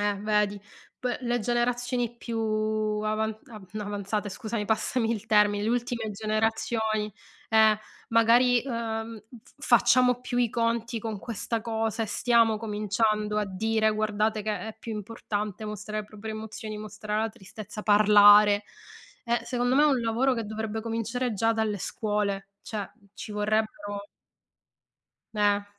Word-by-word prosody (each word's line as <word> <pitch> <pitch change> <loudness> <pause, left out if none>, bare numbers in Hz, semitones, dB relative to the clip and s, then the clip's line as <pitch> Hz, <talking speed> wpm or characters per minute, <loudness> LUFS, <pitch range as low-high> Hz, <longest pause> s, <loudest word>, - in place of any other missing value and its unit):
Eh 205 0 +1
vedi. 210 -1 +1 0.4
P 250 -2 -2
le 240 -1 0
generazioni 240 +1 0
più 235 -1 -5 0.7
avan 215 0 -1
av 215 -3 -10
no, 215 - -4
avanzate, 205 0 -3
scusami, 215 +2 -4
passami 225 +2 0
il 220 -1 -5
termine, 210 -1 +4
le 215 - 0
ultime 235 -2 -1
generazioni, 215 0 -1 0.4
eh, 220 -1 +5 0.3
magari, 235 +2 +4
uhm, 225 -3 -4 0.2
f 270 - -22
facciamo 250 -2 +4
più 245 -1 -2
i 240 -2 +3
conti 230 0 -1
con 220 -1 -4
questa 230 +1 -3
cosa 225 0 -1
e - - -2
stiamo 230 0 +3
cominciando 210 0 0
a 210 - +1
dire: 220 +3 +1
"Guardate 215 0 0
che 215 0 -2
è 220 - -9
più 225 - -6
importante 210 -1 -4
mostrare 210 0 -4
le 210 - -10
proprie 215 +1 -7
emozioni, 215 0 -6
mostrare 215 0 -3
la 225 - 0
tristezza, 215 0 -9
parlare." 205 0 +7 0.6
E 235 0 +1
secondo 245 +1 0
me 290 - +6
è 300 - +6
un 270 -4 +3
lavoro 235 +4 +1
che 230 -2 -3
dovrebbe 220 +1 -4
cominciare 230 +2 -2
già 225 +3 +2
dalle 220 -2 -1
scuole; 205 -1 -2
cioè, 225 -3 -5 0.2
uhm, 200 -3 -26
ci - - -8
vorrebbero 210 -1 -2 1.3
Meh. 205 -1 +2
220 Hz, 145 wpm, -27 LUFS, 210-230 Hz, 1.3 s, parlare